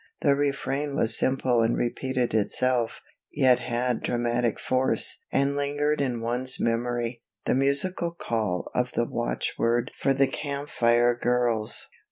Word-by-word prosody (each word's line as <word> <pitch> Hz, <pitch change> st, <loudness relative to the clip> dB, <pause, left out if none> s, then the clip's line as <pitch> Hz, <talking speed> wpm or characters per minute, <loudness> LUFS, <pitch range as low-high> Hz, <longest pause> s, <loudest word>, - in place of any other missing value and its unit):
The 140 Hz, -2 st, +4 dB
refrain 140 Hz, 0 st, -1 dB
was 110 Hz, 0 st, +5 dB
simple 130 Hz, -2 st, +2 dB
and 115 Hz, +1 st, +1 dB
repeated 125 Hz, 0 st, -1 dB
itself, 120 Hz, +2 st, 0 dB, 0.3 s
yet 130 Hz, -4 st, +4 dB
had 120 Hz, 0 st, -1 dB
dramatic 120 Hz, -1 st, 0 dB
force 130 Hz, 0 st, 0 dB
and 140 Hz, +1 st, +1 dB
lingered 145 Hz, +1 st, 0 dB
in 125 Hz, -4 st, -1 dB
one's 125 Hz, +3 st, -1 dB
memory, 120 Hz, 0 st, -1 dB, 0.2 s
the -, -, +2 dB
musical 140 Hz, +7 st, +1 dB
call 110 Hz, -, -3 dB
of -, -, -1 dB
the -, -, +1 dB
watchword 115 Hz, -, -1 dB
for 135 Hz, -, +1 dB
the 135 Hz, +1 st, +4 dB
Camp 140 Hz, +1 st, -5 dB
Fire 120 Hz, +1 st, +3 dB
Girls. 120 Hz, -3 st, +1 dB
125 Hz, 135 wpm, -26 LUFS, 120-140 Hz, 0.3 s, was